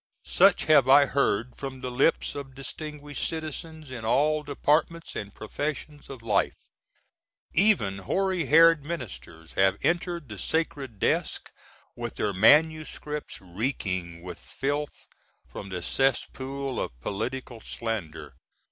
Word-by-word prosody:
Such 195 Hz, -1 st, +5 dB
have 145 Hz, -4 st, +5 dB
I 140 Hz, +1 st, +8 dB
heard 125 Hz, -4 st, 0 dB
from 135 Hz, -2 st, -7 dB
the 125 Hz, -, -4 dB
lips 135 Hz, +6 st, +2 dB
of 135 Hz, -2 st, -8 dB
distinguished 145 Hz, +1 st, -6 dB
citizens 160 Hz, -2 st, -6 dB
in 120 Hz, -3 st, -6 dB
all 150 Hz, +7 st, +2 dB
departments 150 Hz, +3 st, 0 dB
& 100 Hz, -, -20 dB
professions 145 Hz, +5 st, -5 dB
of 130 Hz, -4 st, -9 dB
life. 105 Hz, -3 st, +1 dB, 1.0 s
Even 160 Hz, -, +4 dB
hoary 185 Hz, -, 0 dB
headed 165 Hz, 0 st, +6 dB
ministers 85 Hz, -, -7 dB
have 95 Hz, 0 st, +3 dB
entered 170 Hz, -3 st, 0 dB
the 105 Hz, -4 st, -8 dB
sacred 140 Hz, -, -2 dB
desk -, -, 0 dB, 0.4 s
with -, -, -5 dB
their 105 Hz, -, -1 dB
MSS. 155 Hz, -, +4 dB, 0.4 s
reeking 90 Hz, -4 st, -3 dB
with 90 Hz, -2 st, -8 dB
filth 145 Hz, +2 st, -3 dB, 0.4 s
from 100 Hz, -, -8 dB
the 90 Hz, -2 st, -4 dB
cesspool 135 Hz, +1 st, -1 dB
of -, -, -4 dB
political 120 Hz, -, -4 dB
slander. 85 Hz, -12 st, -5 dB
135 Hz, 120 wpm, -27 LUFS, 105-155 Hz, 1.0 s, I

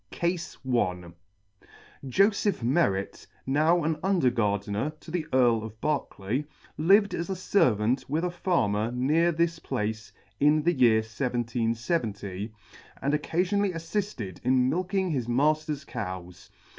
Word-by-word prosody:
CASE 175 Hz, 0 st, -2 dB
i -, -, -9 dB
9 130 Hz, -, -1 dB
1 90 Hz, -7 st, +1 dB
CASE 85 Hz, -1 st, -12 dB, 0.5 s
I. -, -, -25 dB, 0.4 s
JOSEPH 200 Hz, -, +2 dB
MERRET, 115 Hz, -, 0 dB, 0.2 s
now 155 Hz, +5 st, +3 dB
an 155 Hz, 0 st, -1 dB
Under 180 Hz, -9 st, +2 dB
Gardener 105 Hz, +5 st, -1 dB
to 160 Hz, -, -11 dB
the 165 Hz, -3 st, -2 dB
Earl 120 Hz, -4 st, +3 dB
of 110 Hz, 0 st, -9 dB
Berkeley, 140 Hz, -2 st, -2 dB, 0.3 s
lived 195 Hz, +5 st, +4 dB
as 170 Hz, +2 st, -3 dB
a 190 Hz, -, -1 dB
Servant 125 Hz, -, +2 dB
with 155 Hz, +4 st, 0 dB
a 180 Hz, -, 0 dB
Farmer 115 Hz, -, 0 dB
near 150 Hz, +8 st, +2 dB
this 170 Hz, 0 st, 0 dB
place 110 Hz, -3 st, -3 dB, 0.3 s
in 150 Hz, +1 st, +4 dB
the 175 Hz, +2 st, +3 dB
year 120 Hz, -5 st, +4 dB
1770, 115 Hz, -, -2 dB, 0.5 s
and 140 Hz, +2 st, -1 dB
occafionally 180 Hz, +6 st, 0 dB
affifted 165 Hz, -, -4 dB
in 130 Hz, 0 st, +3 dB
milking 185 Hz, +1 st, -1 dB
his 125 Hz, -6 st, -2 dB
matter's 150 Hz, +3 st, +1 dB
cows. 90 Hz, -8 st, -7 dB
135 Hz, 140 wpm, -27 LUFS, 110-170 Hz, 0.5 s, lived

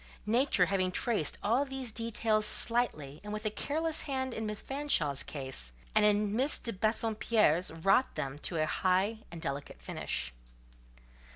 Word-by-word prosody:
Nature 230 Hz, -3 st, +3 dB
having 185 Hz, 0 st, 0 dB
traced 210 Hz, -, -1 dB
all 235 Hz, +7 st, +2 dB
these 270 Hz, -3 st, -5 dB
details 225 Hz, -1 st, 0 dB
slightly, 210 Hz, -, +3 dB
and 210 Hz, -, -7 dB
with 210 Hz, +1 st, -5 dB
a 215 Hz, -, 0 dB
careless 315 Hz, +7 st, 0 dB
hand, 260 Hz, -3 st, -3 dB
in 220 Hz, -1 st, -4 dB
Miss 210 Hz, -1 st, -3 dB
Fanshawe's 270 Hz, -, +1 dB
case; 130 Hz, -, -4 dB, 0.2 s
and 215 Hz, -, +4 dB
in 210 Hz, 0 st, +2 dB
Miss 265 Hz, +5 st, +4 dB
de 230 Hz, -, -5 dB
Bassompierre's, 215 Hz, -4 st, +1 dB
wrought 195 Hz, +10 st, +1 dB
them 135 Hz, +1 st, -4 dB
to 170 Hz, -, -2 dB
a 155 Hz, -, +1 dB
high 190 Hz, +6 st, 0 dB
and 170 Hz, -, -8 dB
delicate 140 Hz, -, -5 dB
finish. 60 Hz, 0 st, -4 dB
210 Hz, 155 wpm, -31 LUFS, 165-235 Hz, 0.2 s, and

